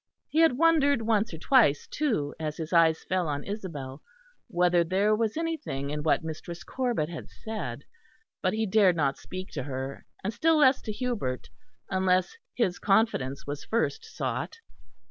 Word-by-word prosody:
He 315 - +1
had 325 -7 +5
wondered 290 -6 +4
once 220 -1 +1
or 165 - -6
twice, 190 - +4
too, 220 - -1
as 155 -1 -3
his 160 +1 -5
eyes 165 -1 +4
fell 185 -2 0
on 145 -1 -2
Isabel, 155 -10 -6 0.5
whether 175 -1 +3
there 195 +5 +2
was 225 +3 -1
anything 310 - -3
in 150 0 -2
what 155 +1 +2
Mistress 165 +2 -6
Corbet 245 -12 -1
had 170 -1 -8
said; 155 - -6 0.6
but 185 - +1
he 220 +1 0
dared 195 -3 +4
not 140 -4 0
speak 185 +1 -7
to 140 - -3
her, 135 0 -5 0.2
and 205 +4 -2
still 320 +6 +3
less 265 -3 +5
to 215 - -4
Hubert, 210 - -3 0.4
unless 185 - +2 0.2
his 190 -7 0
confidence 195 - +1
was 145 0 -5
first 235 - -1
sought. 445 0 -4
185 Hz, 165 wpm, -28 LUFS, 150-230 Hz, 0.6 s, had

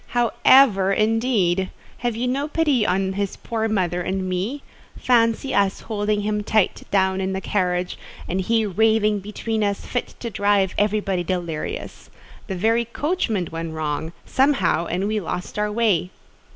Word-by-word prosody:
"How 240 -2 +3
ever, 200 -8 +6
indeed! 215 -4 +1 0.3
Have 240 -2 -1
you 240 +2 -1
no 275 +4 -1
pity 295 -8 +1
on 190 +1 0
his 200 0 -2
poor 225 -1 -2
mother 180 -5 0
and 185 +1 -2
me? 195 +10 -3 0.3
Fancy 235 +1 +2
us 200 -1 +1
holding 210 -1 -1
him 210 0 -1
tight 215 -1 +1
down 190 -1 +2
in 190 0 -1
the 190 - -2
carriage, 180 -2 -1 0.3
and 185 +2 -1
he 225 +3 +1
raving 215 +1 +2
between 215 +2 -3
us, 200 -1 -1
fit 245 - -4
to 235 - -5
drive 200 -2 +2
everybody 205 -3 0
delirious. 170 -3 -4 0.4
The 190 - -3
very 225 +5 +2
coachman 235 - -1
went 165 0 -5
wrong, 155 +1 -3
somehow, 260 - +2
and 185 +4 -1
we 215 0 0
lost 180 +2 -5
our 210 0 0
way." 210 -5 +1
205 Hz, 155 wpm, -22 LUFS, 185-225 Hz, 0.4 s, ever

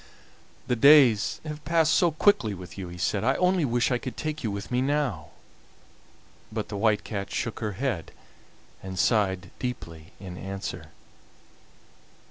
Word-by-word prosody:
"The 125 - 0
days 130 -5 +6
have 150 -1 -6
passed 160 -1 +3
so 175 - +4
quickly 150 - +2
with 90 -1 -10
you," 95 -2 -6
he 85 0 -9
said, 95 +3 -1
"I 135 +4 +2
only 180 -3 +2
wish 120 0 +1
I 125 - +1
could 130 - -7
take 155 -1 -4
you 110 - 0
with 100 +3 -6
me 125 +1 +1
now." 130 - -1 1.2
But 110 -1 -4
the 100 - -5
White 105 0 +2
Cat 100 -3 -5
shook 115 - -3
her 105 -2 -3
head 110 -6 -3 0.7
and 95 -1 -7
sighed 95 -4 +1
deeply 85 -11 -6
in 90 -2 -8
answer. 95 +1 -6
110 Hz, 155 wpm, -26 LUFS, 95-140 Hz, 1.2 s, days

